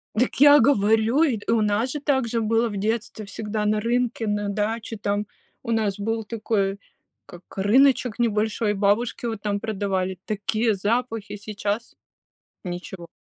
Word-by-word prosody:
Дак 245 +3 +1
я 290 0 +9
говорю, 225 +3 +3
и, 260 -8 +1
э, - - +2
у 225 - +2
нас 210 +4 +1
же 295 - -3
также 255 -5 0
было 225 +2 +2
в 205 - -6
детстве 220 +1 -2
всегда 210 +1 -4
на 210 0 +2
рынке, 235 0 -1
на 205 0 -1
даче 215 +2 -2
там. 205 +1 -1 0.4
У 235 - -3
нас 215 -4 0
был 225 +2 -2
такой 205 -3 -1 0.5
как 175 +1 -13
рыночек 245 +3 +3
небольшой, 215 -1 +1
бабушки 210 +5 0
вот 225 -3 -3
там 205 -1 -1
продавали, 190 -4 -2
такие 215 +2 0
запахи, 220 +1 -2
сейчас 205 +2 -4 0.7
ничего. 175 -1 -7
215 Hz, 150 wpm, -24 LUFS, 205-230 Hz, 0.7 s, я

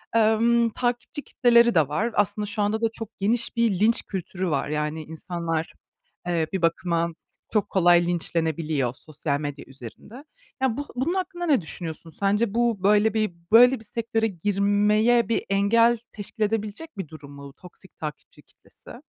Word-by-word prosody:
emm, 230 +1 +3
takipçi 245 +6 -3
kitleleri 235 -1 +4
de 155 -5 +4
var. 215 +11 -1
Aslında 205 +1 +1
şu 205 +1 -3
anda 215 +2 0
da 230 - +3
çok 225 -2 -6
geniş 230 +5 0
bir 225 -6 +1
linç 225 +2 +3
kültürü 185 -1 -4
var. 140 -2 -1
Yani, 150 +1 -2
insanlar, 165 0 -4 0.5
eee, 165 -3 0
bir 190 - -1
bakıma 170 0 0 0.4
çok 210 -3 +1
kolay 175 -2 +4
linçlenebiliyor 160 -6 0
sosyal 145 0 -4
medya 145 -1 -6
üzerinde. 135 - -12 0.4
Ya, 255 -4 +1
bu 285 - -3
bunun 270 +8 0
hakkında 355 -2 -3
ne 280 - +3
düşünüyorsun? 165 0 -7
Sence 200 +5 0
bu 230 -5 0
böyle 210 +1 +4
bir 215 -5 0 0.2
böyle 245 +2 +7
bir 220 - -14
sektöre 225 0 -1
girmeye 205 +5 +2
bir 230 - 0
engel 230 +4 +3 0.2
teşkil 215 +1 -4
edebilecek 215 +7 -3
bir 190 -5 -5
durum 145 -2 -12
mu 140 -1 -11
toksik 180 +3 -16
takipçi 150 -1 -8
kitlesi? - - -16
205 Hz, 155 wpm, -24 LUFS, 165-230 Hz, 0.5 s, böyle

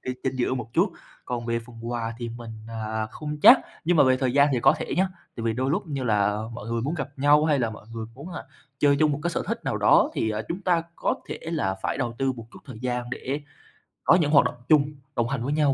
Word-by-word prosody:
cái 125 - -3
chính 130 0 -1
giữa 130 0 0
một 115 -3 -5
chút. - - +2 0.3
Còn 120 -1 -4
về 115 0 0
phần 120 -1 -13
quà 115 -1 -3
thì 120 -1 -4
mình, 115 0 -8 0.2
à, 110 -1 -3
không 150 -1 -6
chắc, - - +10 0.2
nhưng 175 +1 +3
mà - - +7
về 130 0 +4
thời 130 -1 0
gian 140 +2 +5
thì 125 - +1
có - - +6
thể - - -4
nhá, 190 +2 +3 0.3
tại 115 - -4
vì 115 - +1
đôi 130 +4 -1
lúc 190 +5 -1
như 140 -4 -3
là 105 -1 +1
mọi 115 -1 -8
người 115 0 -1
muốn 145 +6 -1
gặp 145 -4 -3
nhau 145 +2 +5
hay 150 -3 +3
là 115 -3 0
mọi 110 - -11
người 110 -1 -5
muốn, 140 +8 -9
à, 170 - -5 0.4
chơi 140 -1 +4
chung 150 0 +3
một 145 - -3
cái 175 - 0
sở - - -2
thích - - -3
nào - - -1
đó, - - +5
thì, 110 - 0
à, 110 0 -2
chúng 180 - -3
ta 175 -3 +2
có - - 0
thể - - -5
là 155 - -1
phải - - -1
đầu 120 -3 -2
tư 135 -1 +1
một 115 -3 -10
chút - - -11
thời 130 -5 -10
gian 125 -1 -2
để 135 +3 -3 0.6
có - - +6
những 155 -5 +2
hoạt 145 - +6
động - - -2
chung, 150 -1 +5 0.2
đồng 115 - +1
hành 130 -3 -2
với 140 +4 -1
nhau 150 -2 +3
130 Hz, 275 wpm, -25 LUFS, 115-150 Hz, 0.6 s, chắc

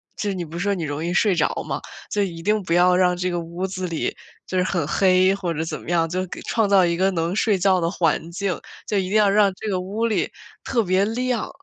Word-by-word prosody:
就 210 - -2
是 195 - -1
你 180 -2 -3
不 165 +2 -8
是 - - -1
说 200 0 +1
你 175 -4 -3
容 145 +1 -3
易 175 - -1
睡 200 +1 +3
着 150 - +1
嘛， - - -3 0.3
所 205 - 0
以 175 -4 -4
一 165 - -8
定 210 +1 +2
不 170 -2 -1
要 180 +1 +5
让 180 -1 +3
这 180 +1 -1
个 175 - -1
屋 170 +2 -4
子 185 -1 -4
里 165 -2 -2 0.3
就 185 - -3
是 180 - +3
很 175 -5 -1
黑 185 +2 +4
或 180 -4 -3
者 160 0 -2
怎 160 -1 -4
么 - - -10
样， 165 -1 +2
就 185 +2 -2
给 - - -8
创 225 -2 +1
造 190 -3 +5
一 170 0 0
个 190 +1 +3
能 170 +1 -1
睡 215 -2 +2
觉 185 0 +3
的 165 -1 0
环 170 -2 0
境， 185 0 -2 0.3
就 205 - 0
一 185 -1 -1
定 215 - +2
要 210 -2 +5
让 200 -1 +4
这 215 +1 -5
个 185 - 0
屋 205 +5 -2
里 220 - 0 0.3
特 235 -4 +1
别 190 +2 +2
亮。 245 +1 -1
185 Hz, 295 characters per minute, -22 LUFS, 170-200 Hz, 0.3 s, 要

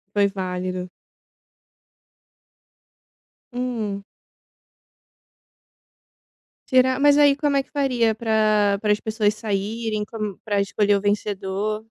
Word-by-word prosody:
Foi 200 -1 +4
válido. 185 -1 -4 2.6
Hum? 225 -5 -3 2.6
Tirar? 260 0 +3
Mas 290 0 +5
aí 290 -1 +5
como 285 -1 0
é 275 - +1
que - - -32
faria 250 -6 +1
pra 215 -2 +2
pra 210 - +1
as 210 - +2
pessoas 215 -1 0
saírem, 215 +1 -3
como 215 -3 -5
para 205 -2 -1
escolher 205 +1 +1
o 200 - -1
vencedor? 205 +1 -2
215 Hz, 100 wpm, -22 LUFS, 200-235 Hz, 2.6 s, Mas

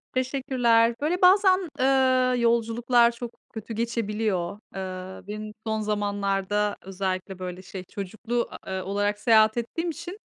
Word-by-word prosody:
Teşekkürler. 250 -3 +2
Böyle 335 +5 0
bazen, 375 -1 +5
eee, 255 -1 +3
yolculuklar 235 +1 +3
çok 235 0 -7 0.2
kötü 225 +1 -6
geçebiliyor. 215 -5 -1 0.2
Eee, 185 0 -6
benim 215 +1 -6
son 220 -1 -1
zamanlarda 205 -1 0
özellikle, 190 0 -4
böyle 180 0 -6
şey, 185 0 -8
çocuklu, 220 +6 -3 0.2
eee, 190 0 -3
olarak 205 +2 -1
seyahat 220 -1 +5
ettiğim 330 +9 -2
için, 355 +5 -7
220 Hz, 120 wpm, -26 LUFS, 200-245 Hz, 0.2 s, bazen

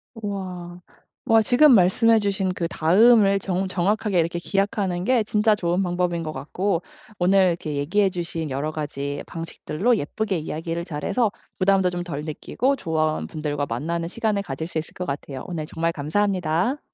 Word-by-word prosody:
우와. 185 -5 -6 0.4
와 225 0 +5
지금 260 +4 +6
말씀해주신 200 -1 +3
그 170 - -1
다음을 200 +5 +5
정 190 0 -1
정확하게 195 +1 +1
이렇게 170 +1 0
기약하는 195 -1 -1
게 240 +1 +3
진짜 210 +1 +2
좋은 180 -1 0
방법인 175 -1 -1
것 155 - -4
같고 170 +6 -2 0.4
오늘 190 +2 +4
이렇게 160 -3 -3
얘기해 185 +8 +2
주신 170 -4 -4
여러가지 145 0 -3
방식들로 165 +6 -1
예쁘게 195 +5 -2
이야기를 165 +2 -4
잘 150 -4 -6
해서 235 -5 +1 0.3
부담도 190 -1 +3
좀 175 0 -3
덜 150 -5 -5
느끼고 255 - -1
조언 155 -6 -1
분들과 145 -2 -3
만나는 165 +8 -2
시간을 215 +1 -1
가질 150 -3 -5
수 165 -1 -3
있을 160 - -8
것 180 - -4
같아요. 140 -3 -5
오늘 160 -4 -5
정말 165 +1 -1
감사합니다. 185 - 0
175 Hz, 360 characters per minute, -23 LUFS, 160-200 Hz, 0.4 s, 지금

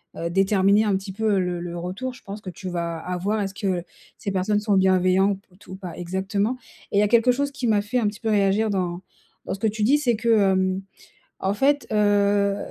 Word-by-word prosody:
heu, - - -7
heu, 170 - 0
déterminer 195 +2 +3
un 205 -3 +1
petit 195 0 -4
peu, 220 0 0
heu, 195 - +3
le 180 -1 -1
le 175 0 -5
retour. 190 +9 -4
Je 260 - -16
pense 200 +1 -8
que 185 - -7
tu 185 +2 -7
vas 170 -1 -3
avoir 180 +5 -2
est-ce 195 -1 -3
que 190 -4 -2 0.3
ces 200 - -4
personnes 200 +2 +1
sont 210 -1 +1
bienveillant 190 +1 +3
p 185 -2 -21
t 190 - -15
ou - - -6
pas 185 -3 -8
exactement 195 +6 -1 0.3
et - - +1
il - - +6
y - - +5
a - - +3
quelque 235 +2 +4
chose 280 +3 -1
qui 260 -3 -3
m'a 210 -2 +3
fait 205 +5 -2
un 215 - +1
petit 205 - -4
peu 225 - -2
réagir 205 +1 +2
dans 180 -2 -2 0.4
dans - - -3
ce 195 - -6
que 220 - +1
tu 215 0 -2
dis, 275 +7 +4
c'est 245 -6 +1
que, 230 +2 -2
hem, 190 -3 +3 0.6
en 195 +1 -1
fait, 285 +5 +2
heu, 205 -1 +3
200 Hz, 245 wpm, -24 LUFS, 185-215 Hz, 0.6 s, il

